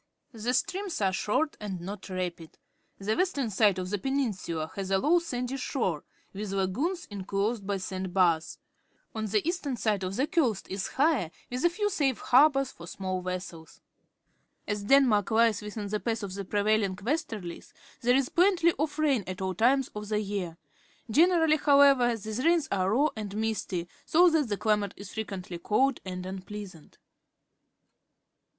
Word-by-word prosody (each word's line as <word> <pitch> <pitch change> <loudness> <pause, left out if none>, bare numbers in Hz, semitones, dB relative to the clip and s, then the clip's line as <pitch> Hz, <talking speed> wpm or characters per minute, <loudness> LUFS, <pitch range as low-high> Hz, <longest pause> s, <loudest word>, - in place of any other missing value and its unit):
The 235 +3 -1
streams 375 +7 -1
are 190 -2 +1
short 295 +11 0
and 200 -4 -5
not 195 +3 -7
rapid. 180 -3 -5 0.4
The 200 +2 -1
western 285 - 0
side 200 -1 +3
of 185 0 -4
the 205 - -1
peninsula 195 - -2
has 195 -1 -4
a 195 - +3
low 315 - +3
sandy 250 -5 -3
shore, 190 - -2 0.3
with 200 0 -5
lagoons 250 - -1
inclosed 200 +2 -2
by 200 -1 0
sand 185 0 -4
bars. 170 -4 +2 0.6
On 220 -1 -3
the 210 +7 0
east 345 -3 -2
ern 260 -3 -2
side 215 -3 +1
the 195 +9 -1
coast 275 - 0
is 195 0 -3
higher, 270 - +1 0.2
with 250 +1 -3
a - - +6
few 415 +4 -1
safe 275 - +1
harbours 275 0 +4
for 170 - -12
small 185 +1 -3
vessels. 180 -3 -6 0.9
As 205 -1 -2
Denmark 240 -5 +4
lies 225 -2 +3
within 210 0 -5
the 210 +1 -2
path 225 -1 -2
of 195 -2 -5
the 200 0 -5
prevailing 205 -1 +1
westerUes, 210 - -4 0.3
there 245 +1 +3
is 270 -1 +2
plenty 355 -1 +4
of 295 0 -1
rain 285 -8 +2
at 185 -1 -5
all 190 0 -2
times 255 +7 +2
of 210 0 -7
the 210 -1 +1
year. 195 -5 -4 0.5
Generally, 320 +2 +4
however, 280 -5 +5
these 220 +4 -4
rains 335 -2 +3
are 190 -1 +1
raw 275 +9 +3
and 210 -2 -5
misty, 215 -5 -2 0.2
so 350 +2 +5
that 305 -6 +1
the 205 - -1
cUmate 210 -2 +1
is 200 -1 -10
frequently 190 -5 -5
cold 260 +9 +1
jind 180 -1 -6
unpleasant. 190 -2 -8
210 Hz, 165 wpm, -28 LUFS, 190-275 Hz, 0.9 s, a